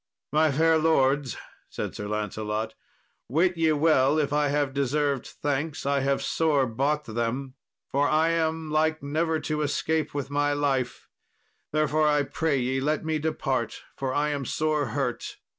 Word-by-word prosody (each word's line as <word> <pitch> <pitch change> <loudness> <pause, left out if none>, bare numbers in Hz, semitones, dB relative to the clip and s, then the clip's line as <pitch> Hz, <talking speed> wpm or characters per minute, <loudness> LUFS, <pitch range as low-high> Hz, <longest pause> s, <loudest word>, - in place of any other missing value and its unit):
"My 155 0 +3
fair 160 +3 +3
lords," 140 -4 +2 0.3
said - - -4
Sir 105 - -5
Lancelot, 105 +1 -3 0.6
"wit 175 +7 +2
ye 165 -1 +2
well 150 -2 +3
if 145 -2 0
I 150 0 +2
have 145 -1 0
deserved 140 0 0
thanks, 145 +1 -3
I 140 0 +2
have 135 0 0
sore 150 -4 +2
bought 140 +6 0
them, 120 +4 -3 0.4
for 140 +1 +2
I 160 +2 +3
am 160 -1 -1
like 155 0 +1
never 160 +3 0
to 150 -1 -2
escape 150 +1 0
with 140 -1 -3
my 145 0 +1
life; 135 -3 -1 0.6
therefore 155 0 +2
I 150 -1 +3
pray 150 +1 0
ye 130 +2 0
let 155 +3 0
me 160 -1 0
depart, 135 -6 -2
for 135 -1 -2
I 145 +3 +1
am 145 -2 -2
sore 155 +1 0
hurt. 135 -4 -3
145 Hz, 160 wpm, -26 LUFS, 135-155 Hz, 0.6 s, My